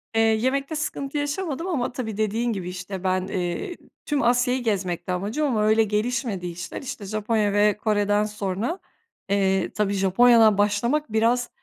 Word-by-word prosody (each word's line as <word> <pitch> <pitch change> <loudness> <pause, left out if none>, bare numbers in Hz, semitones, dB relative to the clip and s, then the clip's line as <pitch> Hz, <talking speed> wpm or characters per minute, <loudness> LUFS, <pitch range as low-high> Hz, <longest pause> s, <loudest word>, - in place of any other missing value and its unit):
Eee, 225 - +4
yemekte 260 +7 +1
sıkıntı 295 -2 -3
yaşamadım 295 +2 -2
ama 280 -10 -1
tabii 225 -5 -5
dediğin 225 +2 0
gibi, 185 -3 -4
işte, 180 +1 -6
ben, 185 0 +1
ııı, 190 - -3 0.3
tüm 290 -3 0
Asya'yı 245 +1 +2
gezmekti 185 -5 -2
amacım 210 +12 -1
ama 220 -6 +1
öyle 220 +1 +4
gelişmedi 215 -2 -1
işler. 170 0 -6
İşte, 245 -6 -6
Japonya 215 0 0
ve 205 0 +3
Kore'den 205 -1 +1
sonra, 210 - -3 0.5
eee, 195 -1 +1
tabii 205 -1 0
Japonya'dan 215 +3 +5
başlamak 225 +7 +1
biraz 235 +2 +2
215 Hz, 150 wpm, -24 LUFS, 200-245 Hz, 0.5 s, Japonya'dan